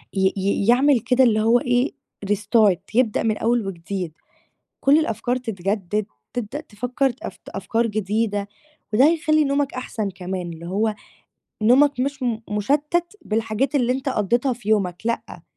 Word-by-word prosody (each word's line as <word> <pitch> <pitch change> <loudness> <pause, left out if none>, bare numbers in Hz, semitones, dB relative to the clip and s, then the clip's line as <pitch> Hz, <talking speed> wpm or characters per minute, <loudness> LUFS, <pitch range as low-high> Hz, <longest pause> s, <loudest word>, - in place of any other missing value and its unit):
ي 190 0 +2
ي 200 +2 0
يعمل 260 +2 +5
كده 250 +3 +3
اللي 215 -3 +3
هو 230 +3 +4
إيه، 245 +3 +1 0.4
restart 210 -2 +3 0.2
يبدأ 240 -4 +2
من 220 -2 +1
أول 230 -3 +1
وجديد. 180 -1 -5 0.7
كُل 285 +3 +5
الأفكار 245 -3 -1
تتجدِّد، 205 -3 -2 0.3
تبدأ 245 +5 -3
تفكّر 250 +1 -1
أف - - -7
أفكار 225 +4 -1
جديدة 205 -1 -1 0.5
وده 255 +5 +6
هيخلّي 310 -2 +3
نومك 280 -1 0
أحسن 220 -5 -3
كمان 180 -1 -5
اللي 165 +1 -9
هو 210 +3 0 0.7
نومك 265 +4 +4
مش 275 0 -2
م 235 -3 0
مشتّت 295 - 0
بالحاجات 225 +5 -1
اللي 250 -2 +2
أنت 265 +1 -3
قضّيتها 240 +4 +1
في 225 -3 -10
يومك 185 -5 +2
لأ، 230 - -3
225 Hz, 145 wpm, -22 LUFS, 205-260 Hz, 0.7 s, وده